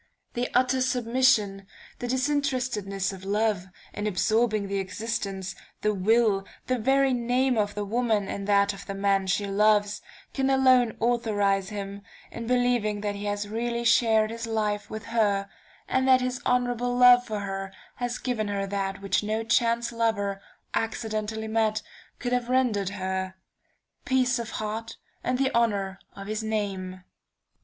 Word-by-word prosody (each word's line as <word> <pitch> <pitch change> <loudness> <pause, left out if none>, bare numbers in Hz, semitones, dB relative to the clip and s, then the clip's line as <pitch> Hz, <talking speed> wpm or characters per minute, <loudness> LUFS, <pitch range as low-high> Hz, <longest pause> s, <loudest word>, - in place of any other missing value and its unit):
The 245 +1 -2
utter 255 +1 +3
submission, 235 -6 +2 0.3
the 245 - -3
disinterestedness 255 -8 -1
of 190 -1 -10
love, 205 -1 0 0.3
in 205 +1 -3
absorbing 215 +1 +1
the 200 0 -1
existence, 195 -1 -3 0.3
the 210 0 +2
will, 210 0 +3 0.2
the 255 -1 0
very 270 +3 +3
name 250 +2 +1
of 205 -2 0
the 205 0 -2
woman 220 -2 0
in 200 0 -4
that 200 0 +3
of 195 - -11
the 195 - -4
man 195 -1 +1
she 200 +2 +1
loves, 205 +1 +2 0.3
can 270 -1 0
alone 255 -4 +4
authorize 205 -5 +1
him 200 -1 -6 0.3
in 230 0 -6
believing 245 -4 +1
that 205 -1 -1
he 200 +1 -6
has 205 0 -2
really 235 +2 -2
shared 225 -2 +4
his 230 0 -5
life 210 -2 -1
with 220 0 -6
her, 205 -4 +1 0.4
and 260 0 +1
that 260 -1 +6
his 250 -1 -2
honorable 245 0 +1
love 245 0 +8
for 215 -4 -4
her 195 -1 -4 0.3
has 245 0 -2
given 240 -4 -2
her 200 -1 -1
that 195 0 -3
which 195 -1 +1
no 215 +2 -1
chance 235 0 +1
lover, 205 -4 -1 0.3
accidentally 220 -1 -2
met, 220 -1 +1 0.3
could 245 0 -3
have 245 -1 0
rendered 240 -7 +2
her: 190 -1 -3 0.7
peace 255 -1 +2
of 235 -1 -4
heart 220 +1 -4 0.3
and 250 0 0
the 265 0 +1
honor 200 -4 +1 0.2
of 195 - -8
his 215 +2 -3
name. 195 -4 -3
220 Hz, 155 wpm, -26 LUFS, 200-245 Hz, 0.7 s, love